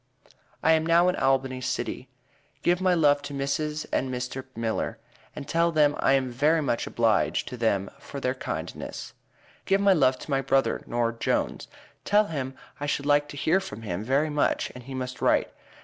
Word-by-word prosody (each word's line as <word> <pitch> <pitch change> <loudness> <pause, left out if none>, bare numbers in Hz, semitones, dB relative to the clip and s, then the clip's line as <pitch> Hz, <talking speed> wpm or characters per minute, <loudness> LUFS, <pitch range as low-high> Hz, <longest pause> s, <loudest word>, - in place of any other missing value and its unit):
i 160 - +5
am 160 0 +4
now 170 +2 +4
in 180 - 0
albany 135 -1 +1
City. - - -3 0.5
give 175 +1 +2
my 185 -1 +3
lov 145 -3 +4
to 140 0 -7
mrs 150 +2 -2
and 130 0 0
mr 125 +1 -4
miller 115 -1 -2 0.4
and 145 -2 -7
tel 170 +3 +2
them 150 -2 +4
i 135 - +3
am 130 -2 +1
very 150 +7 +3
much 135 -6 -1
a - - -4
blige 115 -3 +1
to 125 - -6
them 105 -5 0
for 140 - -8
there 130 -1 0
kind 130 - -5
ns. - - -7 0.5
give 195 0 +3
my 200 -1 +5
lov 130 -6 +3
to 145 - -9
my 135 0 +2
Brother 135 -3 +1
nore 120 -1 0
Jones 115 - -1 0.4
tel 210 +1 +4
him 135 -7 -4 0.2
i 145 - -3
should 140 0 -1
like 145 0 +3
to 145 - -8
here 160 +6 +2
from 190 -12 -8
him 100 -1 -3
very 140 +6 +1
much 145 0 0
and 125 -1 -11
he 135 0 -7
must 125 -1 -5
write. - - +2
140 Hz, 195 wpm, -26 LUFS, 125-155 Hz, 0.5 s, i